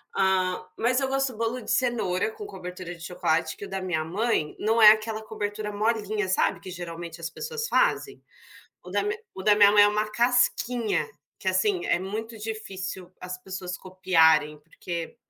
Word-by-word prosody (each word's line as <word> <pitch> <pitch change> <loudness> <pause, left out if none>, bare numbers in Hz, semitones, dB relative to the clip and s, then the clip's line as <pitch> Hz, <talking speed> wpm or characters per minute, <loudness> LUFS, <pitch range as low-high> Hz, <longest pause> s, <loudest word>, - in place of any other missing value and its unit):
hã, 190 -2 +1
mas 250 +3 +2
eu 270 - 0
gosto 270 -2 0
bolo 230 +3 -2
de - - -4
cenoura 240 - +1
com 435 -2 -9
cobertura 180 - -7
de 170 - -17
chocolate 160 -2 -1
que 200 - -7
o - - -10
da 190 0 -3
minha 165 -4 -1
mãe 185 -3 -1
não 225 +2 +2
é 210 -1 +11
aquela 220 0 -1
cobertura 210 -1 -4
molinha 210 -1 0
sabe 185 - +1
que 185 - -8
geralmente 170 -1 -7
as 165 - -4
pessoas 460 - -4
fazem? 410 - +1 0.6
O - - -11
da - - +1 0.3
o 190 - -7
da 210 - +5
minha 205 -1 +6
mãe 210 0 +7
é - - +5
uma 210 +1 -1
casquinha, 240 -5 +2 0.3
que 190 - -2
assim 185 -1 +1
é - - +2
muito 220 +5 -5
difícil 190 -4 -6
as 180 0 -5
pessoas 185 -1 -5
copiarem, 160 -5 +3
porque 170 +4 -6
205 Hz, 175 wpm, -26 LUFS, 180-225 Hz, 0.6 s, é